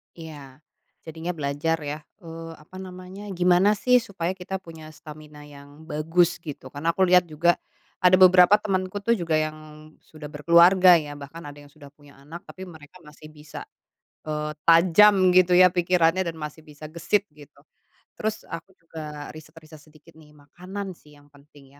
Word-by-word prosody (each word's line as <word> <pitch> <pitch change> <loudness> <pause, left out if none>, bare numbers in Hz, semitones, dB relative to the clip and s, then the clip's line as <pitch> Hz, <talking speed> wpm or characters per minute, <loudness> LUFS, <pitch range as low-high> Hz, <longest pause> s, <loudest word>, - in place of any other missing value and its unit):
Ya. 145 -5 -12 0.4
Jadinya 165 +2 -6
belajar 150 +2 -2
ya, 150 +1 -5 0.2
eee, 165 -1 -9
apa 170 +5 -14
namanya, 185 +1 -10
gimana 180 +3 +3
sih 250 +4 +3
supaya 190 -5 -4
kita 190 +1 -6
punya 165 -3 -12
stamina 150 -1 -13
yang 145 +1 -15
bagus, 165 +3 +1
gitu. 150 -6 -10
Karena 155 +5 -2
aku 190 - -3
lihat 180 -1 +5
juga, 170 +2 +1 0.4
ada 180 0 +3
beberapa 185 +1 +7
temanku 190 -1 -3
tuh 230 +3 +1
juga 170 -3 -3
yang, 155 0 -1 0.4
sudah 155 -2 -13
berkeluarga 170 +3 +5
ya, 145 -1 -9
bahkan 145 +4 -11
ada 145 -2 -11
yang 145 0 -16
sudah 145 -2 -15
punya 145 -1 -21
anak, 165 +5 -11
tapi 190 -1 -11
mereka 155 -3 -16
masih 150 +1 -15
bisa, 150 0 -11 0.6
eee, 150 0 -4 0.2
tajam 185 +3 +5
gitu 180 0 +4
ya 180 +1 +7
pikirannya, 175 0 +1
dan 170 - -4
masih 150 +1 -8
bisa 150 0 -12
gesit 170 +6 -1
gitu. 145 -1 -18 0.5
Terus 215 +1 -5
aku 165 +3 -10
juga 155 -3 -9
riset-riset 155 0 -15
sedikit 155 +2 -20
nih, 150 -1 -20
makanan 185 +7 -9
sih 150 -4 -20
yang 145 0 -23
penting 140 -1 -20
165 Hz, 160 wpm, -24 LUFS, 150-180 Hz, 0.6 s, beberapa